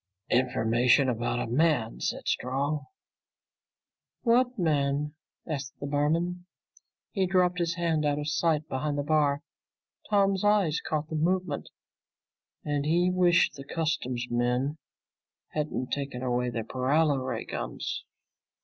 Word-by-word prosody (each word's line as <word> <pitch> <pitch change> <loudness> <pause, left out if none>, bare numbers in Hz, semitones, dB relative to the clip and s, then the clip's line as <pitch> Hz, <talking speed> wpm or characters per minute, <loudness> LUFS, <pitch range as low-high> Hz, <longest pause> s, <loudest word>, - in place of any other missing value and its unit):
"Information 125 +1 +3
about 120 0 -1
a - - -1
man," 130 -2 +1
said - - -2
Strong. 140 +4 -1 1.4
"What 245 +1 +3
man?" 150 -4 +1 0.3
asked 140 -4 -5
the - - -4
barman. 165 +5 0 0.6
He 190 -3 +1
dropped 180 -1 +2
his 170 -1 0
hand 165 -3 0
out 145 -1 +1
of 150 0 -3
sight 155 0 +1
behind 145 +2 -2
the 145 - 0
bar. 145 -1 +2 0.7
Tom's 195 -2 +3
eye 205 -5 +4 0.2
caught 155 0 -1
the 160 - -4
move 180 +4 +1 1.2
and 145 -1 0
he 175 +4 +2
wished 180 -5 +4
the 140 -1 -9
customs 135 -5 -2
men 125 +5 0 0.7
hadn't 150 -4 -3
taken 140 -3 -3
away 125 0 0
their 115 -2 -3
paralo 140 +5 +2
ray 125 -3 -3
guns. - - -4
150 Hz, 125 wpm, -28 LUFS, 130-170 Hz, 1.4 s, eye